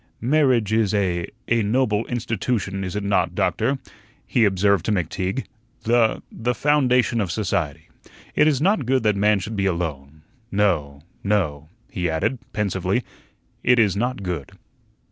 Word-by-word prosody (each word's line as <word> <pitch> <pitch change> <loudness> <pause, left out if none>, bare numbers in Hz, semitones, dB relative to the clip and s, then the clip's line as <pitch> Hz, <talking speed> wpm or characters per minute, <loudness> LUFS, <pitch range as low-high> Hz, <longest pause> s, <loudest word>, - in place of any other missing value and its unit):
"Marriage 125 -5 +2
is 110 -2 +2
a 90 -4 0 0.2
a 115 0 +2
noble 110 0 +1
institution, 110 -4 -2
is 95 +1 -4
it 105 - -2
not, 100 0 +1
Doctor?" 140 - +1 0.5
he 120 -4 +3
observed 100 -1 +2
to - - 0
McTeague. 95 - -1 0.4
"The 115 -1 +2
the 120 +2 -2
foundation 125 -5 +2
of 95 -4 -2
society. 95 -8 -2 0.5
It 150 - +4
is 145 -4 +2
not 165 - +2
good 130 -2 +2
that 105 -1 +3
man 105 +1 +3
should 105 +4 -5
be 100 -1 +1
alone. 80 -4 -4 0.3
No, 80 -8 0 0.2
no," 80 -8 0 0.2
he 90 -6 -1
added, 105 +11 -1
pensively, 105 -3 -1 0.6
"it 125 - +4
is 105 -5 +3
not 120 0 -2
good." 85 -7 -4
105 Hz, 145 wpm, -23 LUFS, 90-120 Hz, 0.6 s, It